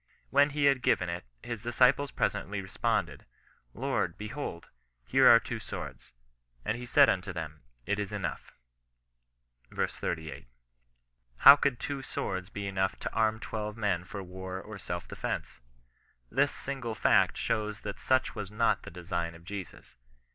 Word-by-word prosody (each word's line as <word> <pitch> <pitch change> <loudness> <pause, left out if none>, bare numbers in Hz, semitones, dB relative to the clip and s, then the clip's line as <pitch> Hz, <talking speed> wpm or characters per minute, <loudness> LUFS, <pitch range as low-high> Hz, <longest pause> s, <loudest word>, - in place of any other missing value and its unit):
When 140 +1 +5
he 145 0 0
had 135 -2 +4
given 90 -7 +2
it, 85 -4 -4 0.2
his 115 -3 -5
disciples 125 +4 +3
presently 100 -5 -1
responded, 95 0 -1
— - - -31
" - - -41
Lord, - - 0
behold, 105 -5 -6 0.4
here - - +5
are - - +9
two - - -5
swords. - - -7 0.5
And 110 - 0
he 120 +1 -7
said 140 +2 +7
unto 90 0 0
them. 80 -4 -6 0.2
It 105 - 0
is 105 -2 -3
enough," - - -4 1.2
ver. - - 0
38. 80 -3 -5 0.9
How 140 - +11
could 140 -4 0
two 140 -1 -3
swords 95 -8 -4
be 100 -1 -5
enough 95 -1 0
to - - -4
arm 110 -1 +2
twelve 105 -1 -4
men 100 -5 0
for 100 +2 -7
war 95 +1 -6
or 105 +1 -9
self 85 -1 -5
defence? - - -4 0.7
This 145 +1 +3
single 125 -5 -4
fact - - +4
shows 105 0 -1
that 105 -1 -6
such 130 0 +2
was 105 -3 -5
not 105 -1 +2
the - - -9
design 85 -1 -3
of 85 0 -15
Jesus. 95 -9 -8
105 Hz, 160 wpm, -30 LUFS, 90-120 Hz, 1.2 s, How